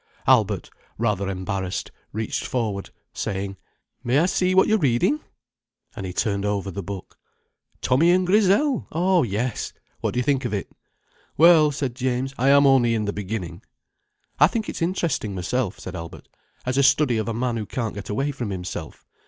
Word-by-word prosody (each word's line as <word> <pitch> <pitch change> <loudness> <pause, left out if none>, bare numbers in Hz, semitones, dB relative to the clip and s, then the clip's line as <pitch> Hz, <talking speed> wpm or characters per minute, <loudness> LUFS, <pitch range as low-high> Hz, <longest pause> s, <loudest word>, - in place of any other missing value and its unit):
Albert, - - +3 0.3
rather 105 -4 0
embarrassed, 95 0 -3 0.2
reached 110 +1 -3
forward, 110 -6 -2 0.2
saying: 100 -1 -3 0.5
"May 120 +3 +2
I 160 - +4
see 185 0 +1
what 190 - +6
you're 220 0 +3
reading!" 140 - +2 0.8
And 95 - -5
he - - -4
turned 100 +1 -1
over 100 -1 -1
the 100 - -5
book. 95 +1 -8 0.6
"'Tommy 135 +7 +3
and 180 +1 +4
Grizel!' 210 +8 +3
Oh 180 +2 +3
yes! 115 +1 -2 0.3
What - - -2
do - - +2
you - - +1
think 135 0 +1
of 120 -4 -1
it?" 100 - -5 0.7
"Well," 160 -1 +7
said 140 -4 -3
James, 130 +1 -2
"I 135 +2 +3
am 140 0 +6
only 125 -4 +4
in 110 -1 -1
the 100 - -2
beginning." 95 -4 -5 0.8
"I 150 - +8
think 220 +4 -3
it's - - -5
interesting, 165 - -1
myself," 95 +3 -1
said - - -8
Albert, 85 0 -8 0.4
"as 130 +2 0
a - - +6
study 130 -4 +4
of 110 - -2
a 115 - -1
man 120 0 -1
who 105 -2 -4
can't 115 -4 -3
get 100 - -8
away 135 +8 0
from 125 -6 -4
himself. 90 -4 -6
120 Hz, 175 wpm, -24 LUFS, 100-145 Hz, 0.8 s, I